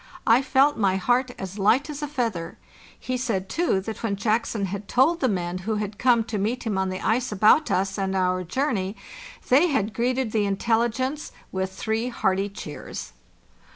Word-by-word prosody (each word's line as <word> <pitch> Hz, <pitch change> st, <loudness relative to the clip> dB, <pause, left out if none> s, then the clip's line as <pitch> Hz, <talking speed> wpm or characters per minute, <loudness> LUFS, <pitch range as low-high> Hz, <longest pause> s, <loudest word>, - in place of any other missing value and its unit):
I 230 Hz, +3 st, +5 dB
felt 275 Hz, +2 st, +3 dB
my 195 Hz, -3 st, +3 dB
heart 245 Hz, +6 st, +1 dB
as 190 Hz, +2 st, -7 dB
light 230 Hz, +9 st, +3 dB
as 300 Hz, -1 st, -6 dB
a 295 Hz, -, -2 dB
feather. 230 Hz, -, -3 dB, 0.4 s
He 255 Hz, 0 st, -3 dB
said, 220 Hz, -7 st, -2 dB
too, 335 Hz, -, +1 dB
that 220 Hz, +3 st, -6 dB
when 220 Hz, -3 st, -1 dB
Jackson 215 Hz, 0 st, 0 dB
had 200 Hz, +2 st, -5 dB
told 305 Hz, +10 st, +3 dB
the 260 Hz, -, +2 dB
men 180 Hz, -2 st, -2 dB
who 215 Hz, +4 st, -2 dB
had 210 Hz, 0 st, -4 dB
come 240 Hz, -2 st, +4 dB
to 215 Hz, -2 st, -4 dB
meet 235 Hz, +5 st, -1 dB
him 220 Hz, -4 st, -1 dB
on 190 Hz, 0 st, 0 dB
the 185 Hz, 0 st, -4 dB
ice 245 Hz, +2 st, 0 dB
about 215 Hz, +10 st, +4 dB
us 195 Hz, +2 st, 0 dB
and 195 Hz, 0 st, -1 dB
our 185 Hz, -1 st, +1 dB
journey, 200 Hz, -, -1 dB, 0.5 s
they 285 Hz, +8 st, +6 dB
had 220 Hz, -, 0 dB
greeted 250 Hz, 0 st, 0 dB
the 215 Hz, -2 st, +1 dB
intelli 225 Hz, +4 st, +1 dB
gence 260 Hz, +6 st, -3 dB, 0.2 s
with 190 Hz, 0 st, -2 dB
three 220 Hz, +5 st, -2 dB
hearty 195 Hz, -4 st, 0 dB
cheers. 160 Hz, -7 st, -8 dB
220 Hz, 190 wpm, -25 LUFS, 195-255 Hz, 0.5 s, they